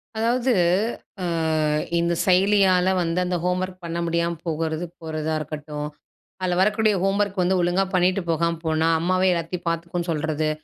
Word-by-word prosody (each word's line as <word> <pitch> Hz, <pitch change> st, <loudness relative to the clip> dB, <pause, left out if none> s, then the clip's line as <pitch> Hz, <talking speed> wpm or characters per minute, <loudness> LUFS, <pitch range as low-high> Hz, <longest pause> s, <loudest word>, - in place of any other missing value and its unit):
அதாவது, 240 Hz, +3 st, +1 dB, 0.7 s
ஆ -, -, -3 dB, 0.8 s
இந்த 170 Hz, 0 st, +1 dB
செயலியால 190 Hz, -1 st, +4 dB
வந்து 165 Hz, +1 st, 0 dB
அந்த 180 Hz, 0 st, -1 dB
ஹோம்வர்க் 185 Hz, 0 st, -2 dB
பண்ண 170 Hz, 0 st, -4 dB
முடியாம 170 Hz, 0 st, 0 dB
போகுறது, 160 Hz, 0 st, -2 dB, 0.2 s
போறதா 160 Hz, -1 st, -3 dB
இருக்கட்டும். 150 Hz, 0 st, -5 dB, 0.5 s
அதுல 180 Hz, -1 st, 0 dB
வரக்கூடிய 210 Hz, +1 st, +3 dB
ஹோம்வர்க் 195 Hz, 0 st, +1 dB
வந்து 185 Hz, +1 st, +2 dB
ஒழுங்கா 175 Hz, +2 st, +2 dB
பண்ணிட்டு 185 Hz, +1 st, +2 dB
போகாம 170 Hz, +1 st, +1 dB
போனா 160 Hz, 0 st, +1 dB
அம்மாவே 185 Hz, +3 st, +2 dB
எல்லாத்தையும் 170 Hz, +1 st, -4 dB
பாத்துக்கும்னு 170 Hz, +1 st, -3 dB
சொல்றது, 155 Hz, 0 st, -1 dB
175 Hz, 135 wpm, -23 LUFS, 165-185 Hz, 0.8 s, செயலியால